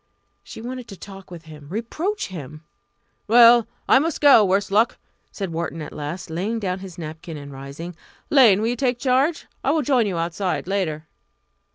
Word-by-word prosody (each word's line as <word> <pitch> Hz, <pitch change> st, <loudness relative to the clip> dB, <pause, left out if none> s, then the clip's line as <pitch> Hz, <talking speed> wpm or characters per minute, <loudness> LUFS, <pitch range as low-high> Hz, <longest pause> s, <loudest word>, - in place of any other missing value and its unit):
She -, -, -11 dB
wanted 250 Hz, 0 st, -6 dB
to 195 Hz, -, -10 dB
talk 195 Hz, 0 st, -11 dB
with 170 Hz, -2 st, -10 dB
him 150 Hz, -2 st, -13 dB
reproach 310 Hz, -, -3 dB
him! 155 Hz, -3 st, -9 dB, 0.6 s
"Well 235 Hz, +1 st, +7 dB, 0.2 s
I -, -, +6 dB
must 320 Hz, +2 st, -2 dB
go 280 Hz, -7 st, +7 dB
worse 195 Hz, +1 st, +1 dB
luck," 220 Hz, +4 st, +3 dB, 0.3 s
said 195 Hz, -4 st, -5 dB
Wharton 165 Hz, 0 st, -3 dB
at 150 Hz, -, -7 dB
last, 155 Hz, +4 st, -6 dB
laying 195 Hz, +8 st, -2 dB
down 185 Hz, -3 st, -2 dB
his 190 Hz, -3 st, -10 dB
napkin 160 Hz, 0 st, -7 dB
and 140 Hz, -1 st, -9 dB
rising. 140 Hz, +6 st, -8 dB, 0.4 s
"Lane, 230 Hz, -8 st, +6 dB
will 225 Hz, -, +1 dB
you 245 Hz, -, -1 dB
take 245 Hz, -1 st, 0 dB
charge? 270 Hz, +5 st, +1 dB, 0.2 s
I -, -, +1 dB
will 305 Hz, +1 st, +2 dB
join 250 Hz, -5 st, +2 dB
you 185 Hz, -4 st, -2 dB
outside 175 Hz, +3 st, -2 dB
later." 175 Hz, -5 st, -2 dB
195 Hz, 180 wpm, -22 LUFS, 165-240 Hz, 0.6 s, Well